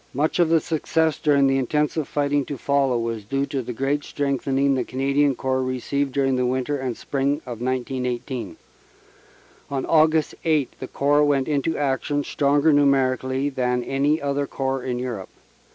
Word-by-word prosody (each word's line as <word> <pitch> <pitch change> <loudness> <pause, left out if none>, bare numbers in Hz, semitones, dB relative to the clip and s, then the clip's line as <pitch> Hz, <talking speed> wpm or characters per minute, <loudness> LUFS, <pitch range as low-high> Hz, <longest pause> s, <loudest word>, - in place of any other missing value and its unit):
Much 150 +6 0
of 170 -2 +4
the 165 0 +4
success 160 0 0
during 140 -2 +3
the 135 0 +2
intensive 150 +3 0
fighting 145 -1 0
to 140 +1 -6
follow 135 -1 +1
was 115 -2 -3
due 135 +6 -1
to 140 -1 -3
the 125 - -6
great 135 +4 -1
strengthening 140 0 0
the 130 -2 0
Canadian 140 +2 +1
Corps 130 0 -1
received 130 +2 -2
during 135 -1 +1
the 125 - +1
winter 130 +3 -1
and 130 -3 -3
spring 140 0 0
of 120 -3 -7
1918. 125 0 -3 1.1
On 135 -1 -2
Aug. 155 -1 +3
8 155 -5 +1
the - - -5
Corps 145 +1 +2
went 140 -2 +2
into 150 +2 0
action 145 +1 0
stronger 145 +2 +2
numerically 135 -1 +2
than 125 -3 -1
any 140 +4 +1
other 140 0 -1
Corps 135 -1 -2
in 125 -2 -2
Europe. 120 -7 -5
135 Hz, 165 wpm, -23 LUFS, 130-145 Hz, 1.1 s, of